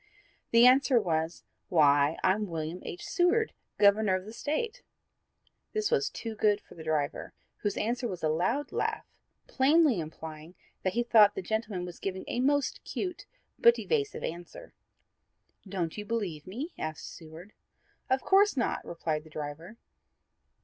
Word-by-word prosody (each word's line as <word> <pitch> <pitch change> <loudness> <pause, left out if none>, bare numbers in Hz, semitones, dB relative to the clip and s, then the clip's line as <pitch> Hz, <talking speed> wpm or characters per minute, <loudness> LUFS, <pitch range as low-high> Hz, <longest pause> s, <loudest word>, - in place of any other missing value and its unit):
The 230 +1 +6
answer 260 0 +6
was, 165 -4 -2 0.3
"Why, 145 -2 +4
I'm 205 +3 +2
William 165 +1 -4
H. 175 - -7
Seward, 370 +6 +2 0.2
Governor 205 -1 +4
of 185 0 -4
the 215 - -9
State." 435 - -3 0.9
This 430 +1 0
was 440 -3 +2
too 225 -1 -6
good 210 -1 +2
for - - -17
the 160 - -10
driver, 155 -2 -2 0.2
whose 205 -2 -2
answer 240 +3 -1
was 185 -6 -6
a - - +3
loud 190 - 0
laugh, - - -2 0.4
plainly 285 - +3
implying 160 +1 -8 0.3
that 185 - -1
he 240 - +1
considered 235 -2 +6
that 205 0 +3
the - - -3
gentleman 210 -3 -2
had 175 -1 -10
given 190 -1 -3
a - - -2
most 285 +2 +1
cute 360 -2 -5 0.3
but 470 0 +6
evasive 430 -2 -1
answer. 175 - -7 1.0
"Don't 175 -4 -2
you 210 - -5
believe 200 -9 -3
me?" 265 - -5
asked 155 -1 -5
Seward. 165 +5 -11 0.6
"Of 260 0 +1
course 395 -3 +4
not," 240 - 0
replied 160 -2 -3
the 155 - -15
driver. 155 +7 -7
205 Hz, 155 wpm, -29 LUFS, 165-260 Hz, 1.0 s, The